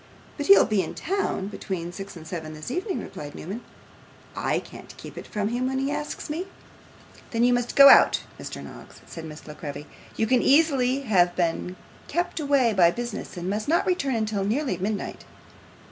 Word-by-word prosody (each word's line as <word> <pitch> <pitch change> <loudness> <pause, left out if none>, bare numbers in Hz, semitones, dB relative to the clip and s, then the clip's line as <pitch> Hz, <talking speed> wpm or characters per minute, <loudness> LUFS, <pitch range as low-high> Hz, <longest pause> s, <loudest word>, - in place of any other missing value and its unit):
'But 290 - -4
he'll 395 - +8
be 210 -4 +1
in - - -6
town 375 - -1
between 180 -4 -5
six 195 +1 -8
and 160 - -11
seven 160 -3 -6
this 155 +10 -7
evening,' 370 - -2
replied 145 -1 -8
Newman. 200 +8 -6 0.7
'I - - 0
can't - - -12
keep - - -10
it - - -8
from 210 -1 -2
him 245 +2 -1
when 265 0 -1
he 270 +1 0
asks 295 0 -4
me.' 330 +5 -4 0.8
'Then 230 0 0
you 245 0 +5
must 245 0 -1
go 280 0 +10
out, - - +7 0.2
Mr. - - -7
Noggs,' - - -12
said 165 -1 -8
Miss 155 -1 -10
La 150 - -7
Creevy. 145 -1 -7 0.3
'You 225 - +1
can 245 +2 +3
easily 275 -3 +3
have 180 -8 +3
been 180 +1 -1 0.3
kept 350 +2 -1
away 280 -6 +3
by 175 -4 +6
business, 235 0 -5
and 175 +1 -4
must 210 +2 -2
not 330 +3 +2
return 275 -11 0
till 210 -2 -2
nearly 255 +8 0
midnight. 205 +3 -3
225 Hz, 190 wpm, -25 LUFS, 180-280 Hz, 0.8 s, go